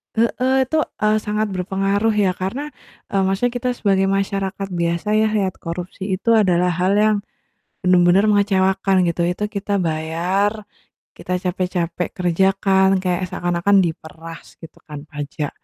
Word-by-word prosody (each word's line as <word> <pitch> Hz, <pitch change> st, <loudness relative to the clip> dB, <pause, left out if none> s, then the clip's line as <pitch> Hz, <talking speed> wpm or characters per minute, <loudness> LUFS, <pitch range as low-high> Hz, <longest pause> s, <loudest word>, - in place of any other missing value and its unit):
heeh, 255 Hz, +3 st, +2 dB
itu, 315 Hz, +5 st, -1 dB, 0.2 s
eee, 215 Hz, 0 st, +3 dB
sangat 210 Hz, 0 st, -2 dB
berpengaruh 195 Hz, +3 st, 0 dB
ya 200 Hz, -3 st, +2 dB
karena, 245 Hz, +12 st, -4 dB, 0.4 s
eee, 200 Hz, -, +1 dB
maksudnya 195 Hz, +6 st, +1 dB
kita 245 Hz, +1 st, -2 dB
sebagai 195 Hz, -4 st, +1 dB
masyarakat 195 Hz, 0 st, -2 dB
biasa 170 Hz, +3 st, -1 dB
ya, 215 Hz, +1 st, +3 dB
lihat 205 Hz, -4 st, -1 dB
korupsi 180 Hz, +3 st, -6 dB
itu 230 Hz, +5 st, 0 dB
adalah 180 Hz, -5 st, +3 dB
hal 180 Hz, +4 st, +1 dB
yang 215 Hz, 0 st, +3 dB, 0.7 s
bener-bener 180 Hz, +1 st, +4 dB
mengecewakan, 195 Hz, -2 st, +2 dB
gitu. 170 Hz, 0 st, 0 dB
Itu 180 Hz, +4 st, -2 dB
kita 200 Hz, -1 st, -2 dB
bayar, 180 Hz, +6 st, -1 dB, 0.5 s
kita 180 Hz, -, -4 dB
capek-capek 180 Hz, -1 st, -2 dB
kerja 180 Hz, +1 st, +2 dB
kan, 190 Hz, -1 st, +3 dB
kayak 185 Hz, 0 st, -1 dB
seakan-akan 175 Hz, +2 st, +1 dB
diperas, 165 Hz, -1 st, -7 dB
gitu 165 Hz, -, -12 dB
kan, 145 Hz, -1 st, -7 dB
pajak. 145 Hz, 0 st, -4 dB
190 Hz, 140 wpm, -20 LUFS, 175-205 Hz, 0.7 s, bener-bener